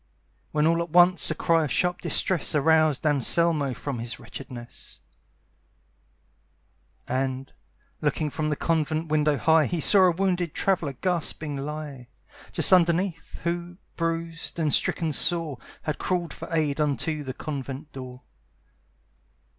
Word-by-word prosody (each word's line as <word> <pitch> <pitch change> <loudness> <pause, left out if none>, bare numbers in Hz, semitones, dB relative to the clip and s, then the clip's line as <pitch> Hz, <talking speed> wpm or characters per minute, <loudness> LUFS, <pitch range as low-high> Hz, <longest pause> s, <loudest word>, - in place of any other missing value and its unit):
When 150 0 +1
all 165 +1 +2
at 170 - -4
once 175 -1 +6
a 155 - -1
cry 165 0 +2
of 140 - -5
sharp 180 +4 0
distress 180 -4 +1
Aroused 155 0 +3
Anselmo 145 -1 +2
from 140 -5 -5
his 120 +1 -4
wretchedness; 125 -3 -10 2.1
And, 130 +1 -3 0.5
looking 150 0 -1
from 155 +1 -2
the 150 - 0
convent 160 0 -1
window 150 -1 +2
high, 160 0 +3
He 175 - -2
saw 190 +5 +5
a 180 - +5
wounded 180 -2 -1
traveller 175 -7 0
gasping 160 -1 -2
lie 140 -2 -6 0.4
Just - - +5
underneath, 175 0 +1
who, 175 +1 -3 0.2
bruised 165 0 -3
and 155 -3 +1
stricken 160 -3 +1
sore, 160 -4 +1 0.2
Had 155 - -3
crawled 175 -3 -2
for - - -9
aid 155 -2 0
unto 150 +1 -1
the 130 -2 -6
convent 140 0 -6
door. 130 -1 -9
155 Hz, 130 wpm, -25 LUFS, 140-170 Hz, 2.1 s, once